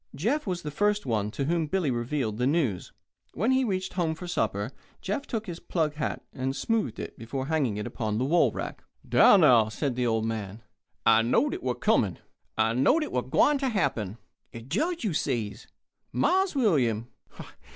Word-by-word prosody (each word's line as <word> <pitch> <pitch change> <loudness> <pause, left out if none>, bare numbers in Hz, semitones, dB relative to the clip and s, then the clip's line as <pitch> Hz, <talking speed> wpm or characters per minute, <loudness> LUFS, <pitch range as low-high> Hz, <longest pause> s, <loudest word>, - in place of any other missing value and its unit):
Jeff 230 - -1
was 180 -2 -2
the 150 - -4
first 205 +6 +1
one 105 -4 0
to 135 +5 -3
whom 165 +1 0
Bill 185 0 0
revealed 120 -2 -2
the 125 - +2
news. 135 - 0 0.4
When 220 - +1
he 260 0 +3
reached 190 -5 -2
home 165 -3 0
for 180 - -8
supper 110 - -1 0.3
Jeff 210 +9 -3
took 225 -2 -3
his 175 -3 -6
"plug" 155 -4 -1
hat 135 -10 -3
and 130 +1 -2
smoothed 210 - -1
it - - -7
before 130 +4 -4
hanging 140 -8 0
it 105 - -3
upon 110 -2 -3
the 125 - 0
hall 170 +5 +3
rack. - - -6 0.2
"Dar - - +7
now!" 125 - +5
said 120 +5 -2
the 125 -1 0
old 110 -1 +1
man: 110 -1 -4 0.4
"I 110 - +6
knowed 125 - +2
it - - -5
was 125 -1 -1
er - - -22
comin'. 95 -6 +2 0.4
I 110 +1 +2
knowed 145 - +3
it - - -5
was - - -1
gwine 295 -1 +4
ter 265 -1 0
happen. 115 - -1 0.4
Er 115 - -6
Judge, 305 - -2
you 205 -6 0
says, 115 -8 -2 0.4
Mars 370 - +2
William? 130 - +2
140 Hz, 195 wpm, -27 LUFS, -, 0.4 s, Dar